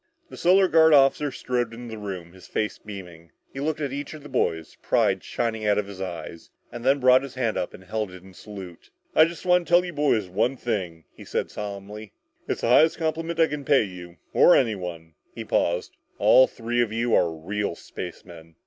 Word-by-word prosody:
The - - -8
Solar 185 +2 +4
Guard 160 -2 +6
officer 140 +1 +4
strode 120 -2 -2
into 120 0 -9
the 110 - -7
room, 90 -4 -6
his 95 - -15
face 105 - -2
beaming. 90 -5 -11 0.2
He 135 - -6
looked 155 +2 -2
at 140 -2 -2
each 145 +2 -5
of 150 - -12
the 150 - -11
boys, 80 -1 -1
pride - - +1
shining 110 -2 -2
out 105 -1 +3
of 105 - 0
his 100 -1 -9
eyes, 85 -2 -7 0.2
and 120 - -8
then 135 +2 +3
brought 130 0 +6
his 135 -2 -9
hand 120 -4 -1
up - - -2
and 95 - -14
held 105 +2 -3
it 90 -1 -12
in 95 0 -15
salute. 95 -4 -11 0.2
"I 155 - +7
just 170 +2 -7
want 180 -1 +3
to - - -11
tell 175 +1 +5
you 175 - -6
boys 140 -9 +1
one 110 +8 0
thing," 95 -9 -3
he - - -13
said - - -3
solemnly. 105 +1 -7 0.3
"It's - - -2
the - - 0
highest 155 +6 +5
compliment 165 +1 -2
I 165 - +7
can 150 -2 -5
pay 135 -2 +4
you, 90 -3 -9 0.2
or 175 - +6
anyone." 90 -9 -2 0.2
He - - -6
paused. 85 +1 0 0.2
"All 130 - +6
three 120 +1 -2
of 115 -3 0
you 115 +1 -1
are 85 - +4
real 90 +4 -3
spacemen!" 85 -2 -10
110 Hz, 210 wpm, -25 LUFS, 95-140 Hz, 0.3 s, I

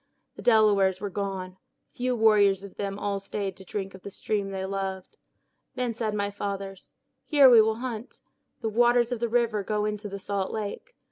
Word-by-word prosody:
The - - -9
Delawares 205 -5 +4
were 205 -1 -4
gone. 190 -2 -4 0.3
Few 250 0 -1
warriors 205 -4 +4
of 200 - -10
them 195 -1 -4
all 200 -1 -2
stayed 195 -1 -4
to 190 - -12
drink 195 0 -5
of 190 - -12
the 200 - -7
stream 200 0 -2
they 190 -1 -4
loved. 190 -1 -5 0.6
Then 250 -2 -1
said 220 -2 -2
my 205 0 -1
fathers, 195 -1 -6 0.4
'Here 285 -3 +7
will 220 -3 +6
we - - -10
hunt. 240 -2 -6 0.4
The 225 - -1
waters 240 +2 +3
of 245 - -2
the 235 0 -1
river 230 -3 +1
go 210 +1 -1
into 210 0 -3
the 200 - -5
salt 195 -1 -3
lake. 220 - -5
205 Hz, 190 wpm, -27 LUFS, 195-225 Hz, 0.6 s, Here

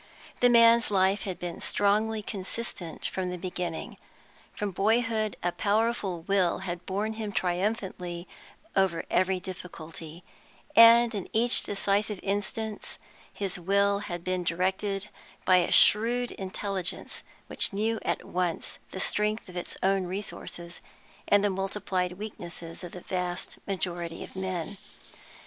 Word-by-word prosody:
The 245 - +6
man 230 -1 +8
s 235 - -2
life 195 0 +2
had 185 -3 -3
been 175 -1 -5
strongly 210 +2 +1
consistent 195 -4 -5
from 185 -1 -2
the 180 - -4
beginning; 175 -2 -4 0.5
from 205 -1 -3
boyhood 220 +1 +1
a 175 - +2
powerful 205 -4 0
will 190 -2 +2
had 175 -1 -5
borne 205 +3 -1
him 220 -2 -4
triumphantly 180 -2 -2 0.5
over 190 -4 +2
every 185 0 +2
difficulty, 170 -2 -9 0.5
and 230 +1 +8
in 200 -4 -4
each 235 +2 +4
decisive 205 0 0
instance 205 +2 -3 0.3
his 195 -2 -3
will 200 +3 +3
had 175 -4 -5
been 185 0 -1
directed 190 +4 -1 0.4
by 185 -1 +6
a 175 - +2
shrewd 240 +3 +5
intelligence 190 -1 -3 0.2
which - - +2
knew 220 +3 0
at - - -2
once 180 -2 -2
the 190 - -6
strength 210 +3 0
of 180 - -11
its 175 - -5
own 195 0 +3
resources 175 -2 -4 0.5
and 205 0 +5
the 205 - +3
multiplied 190 -1 -1
weaknesses 175 -4 -7
of 175 - -8
the 180 - -8
vast 180 -1 -3
majority 175 -3 -3
of - - -12
men. 185 0 -3
195 Hz, 135 wpm, -28 LUFS, 180-210 Hz, 0.5 s, man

